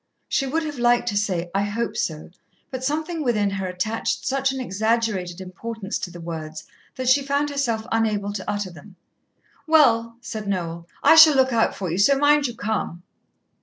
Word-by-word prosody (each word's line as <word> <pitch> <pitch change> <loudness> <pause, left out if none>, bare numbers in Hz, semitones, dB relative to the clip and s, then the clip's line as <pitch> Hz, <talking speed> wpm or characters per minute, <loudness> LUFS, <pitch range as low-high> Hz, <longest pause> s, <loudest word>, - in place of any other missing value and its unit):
She 275 - 0
would 320 +5 -1
have 295 -4 -5
liked 240 0 +3
to 205 - -3
say, 180 -4 -1
"I 195 - +1
hope 215 +3 -2
so," 155 0 -3 0.4
but 260 -1 -5
something 315 +4 -2
within 210 -6 +1
her 195 -1 -3
attached 200 +5 -2
such 270 0 +1
an 265 - -5
exaggerated 215 -5 -1
importance 195 +3 -5
to - - -5
the 175 0 -11
words 160 -2 -6 0.3
that 260 -2 -4
she 265 +3 +5
found 280 +1 -1
herself 235 -6 -1
unable 210 -3 0
to 200 -1 -5
utter 205 -2 -2
them. 180 +4 -14 0.7
"Well," 230 -7 +4
said 215 -3 -6
Noel, 170 -3 -3 0.2
"I - - +7
shall 315 -2 +9
look 260 -1 +3
out 225 -1 +2
for 185 -4 -4
you, 175 - -2
so 275 +7 +5
mind 290 0 +4
you 240 - -7
come." 210 -6 -3
225 Hz, 185 wpm, -23 LUFS, 190-265 Hz, 0.7 s, shall